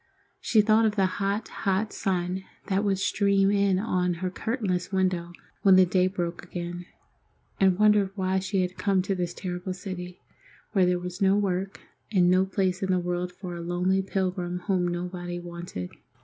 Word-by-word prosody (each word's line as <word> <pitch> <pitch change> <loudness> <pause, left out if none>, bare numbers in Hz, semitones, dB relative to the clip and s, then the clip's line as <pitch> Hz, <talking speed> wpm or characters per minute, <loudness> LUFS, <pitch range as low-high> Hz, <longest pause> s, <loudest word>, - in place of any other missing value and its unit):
She 220 - +4
thought 220 +1 +4
of 210 - -1
the 195 -3 +3
hot, 200 +3 -1
hot 200 +1 -1
sun 185 0 -1 0.3
that 195 +1 +1
would 200 -2 +1
stream 200 0 +2
in 200 -2 +3
at 180 -3 0
her 180 +2 -3
curtainless 190 -5 -2
window 185 -3 0 0.3
when 195 -2 +6
the 185 0 +7
day 185 +1 +2
broke 175 -3 -3
again, 175 0 -6 0.7
and 190 -2 +4
wondered 210 -2 +4
why 190 -1 0
she 190 0 0
had 180 0 -5
come 195 -2 +2
to 195 - -1
this 175 -2 -3
terrible 180 0 -4
city, 180 -1 -7 0.5
where 190 -4 +3
there 180 0 +2
was 180 +2 -6
no 195 0 +4
work, 195 -1 -1 0.3
and 180 -4 +4
no 185 +1 +3
place 190 -1 0
in 190 - -1
the 185 - +3
world 180 0 -2
for 180 -1 -7
a 170 - -6
lonely 180 +3 +1
pilgrim 185 -2 -2
whom 180 -1 0
nobody 175 0 -4
wanted. 170 - -7
185 Hz, 175 wpm, -27 LUFS, 180-195 Hz, 0.7 s, the